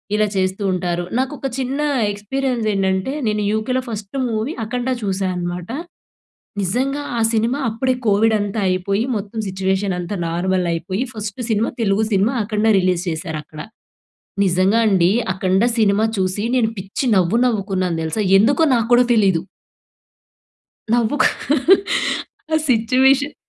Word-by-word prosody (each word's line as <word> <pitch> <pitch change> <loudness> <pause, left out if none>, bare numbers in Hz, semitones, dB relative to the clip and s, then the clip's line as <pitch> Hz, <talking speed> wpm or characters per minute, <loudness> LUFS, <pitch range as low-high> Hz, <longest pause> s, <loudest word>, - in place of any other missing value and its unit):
ఇలా 215 0 +2
చేస్తూ 190 +2 -1
ఉంటారు. 175 -1 -1
నాకొక 270 +2 -2
చిన్న 270 +3 -2 0.3
ఎక్స్‌పీరియన్స్ 240 +3 -2
ఏంటంటే 190 +4 0 0.2
నేను 210 0 0
యూకేలో 235 +4 0
ఫస్ట్ 210 0 -7
మూవీ 225 +6 -2
'అఖండ' 245 +3 -2
చూశానమాట. 180 -2 -3 0.9
నిజంగా 265 +9 -1 0.2
ఆ - - 0
సినిమా 230 +5 +1
అప్పుడే 255 +4 0
కోవిడ్ 215 +2 +3
అంతా 205 +1 -2
అయిపోయి, 195 +4 0
మొత్తం 205 +2 -5
సిట్యుయేషన్ 190 0 -1
అంతా 175 +3 -4
నార్మల్ 180 +2 0
అయిపోయి, 185 +6 -3
ఫస్ట్ 210 +1 -6
సినిమా, 220 +1 +1
తెలుగు 210 0 +2
సినిమా 200 +6 +2
'అఖండ' 215 +1 +1
రిలీజ్ 180 -1 +1
చేశారు 160 -1 -4
అక్కడ. 155 +1 -15 0.9
నిజంగా 190 +5 +3
అండి. 185 -2 +3 0.2
'అఖండ' 190 +4 +1
సినిమా 210 -1 +3
చూసి 190 +2 -1
నేను 225 -2 +1
పిచ్చి 195 +8 -4
నవ్వు, 190 +5 +2
నవ్వుకున్నాను 190 -6 -1
తెలుసా! 185 +7 -1 0.2
ఎందుకో 275 +10 +3
నాకు 230 -1 0
కూడా 245 +1 +6
తెలీదు. 195 -7 +3 1.5
నవ్వుకు. 240 +4 +3 1.3
ఆ - - +5
సిచ్యుయేషన్ 260 +5 +3
205 Hz, 130 wpm, -19 LUFS, 185-230 Hz, 1.5 s, కూడా